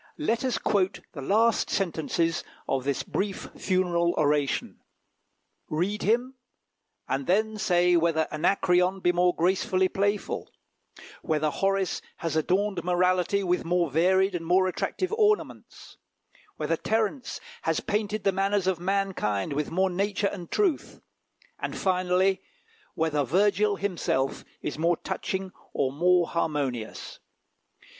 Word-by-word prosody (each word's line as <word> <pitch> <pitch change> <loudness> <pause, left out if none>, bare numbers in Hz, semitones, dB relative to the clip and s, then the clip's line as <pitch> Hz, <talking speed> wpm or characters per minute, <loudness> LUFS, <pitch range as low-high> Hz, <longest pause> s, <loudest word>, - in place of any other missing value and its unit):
Let 250 -5 0
us 255 -2 0
quote 195 -2 0
the 145 - -8
last 220 +9 +2
sentences 165 -2 0 0.2
of 135 -1 -1
this 140 -2 -1
brief 195 -1 -3
funeral 175 -2 +1
oration: 145 -2 0 0.9
"Read 185 +7 -1
him, 240 +5 +1 0.7
and 135 +1 -2
then 215 +4 +2
say 180 -3 +3
whether 165 -2 +2
Anacreon 180 +3 +2
be 175 - +3
more 180 0 +2
gracefully 185 +1 +2
playful; 205 +2 -1 0.7
whether 155 -1 0
Horace 195 +2 0 0.2
has 165 -2 -3
adorned 185 +3 0
morality 180 +2 +2
with 180 -1 0
more 175 -2 +1
varied 190 +5 +3
and 175 -2 -3
more 180 +3 +3
attractive 370 - -2
ornaments; 425 -1 -1 0.6
whether - - -1
Terence 225 +4 -1 0.2
has 160 -1 0
painted 210 0 -2
the 195 - +3
manners 195 0 0
of 185 -3 0
mankind 180 - -1
with 150 +1 -2
more 185 +2 +1
nature 200 +2 0
and 175 -4 -8
truth; 380 -8 0 0.6
and - - -4
finally, 185 +1 +1 0.5
whether 155 -2 +1
Virgil 200 - +2
himself 175 -9 -1 0.2
is 150 - -4
more 170 +1 +2
touching 190 0 -4 0.2
or 130 - 0
more 175 +4 +3
harmonious." 140 -9 -3
185 Hz, 125 wpm, -27 LUFS, 165-200 Hz, 0.9 s, say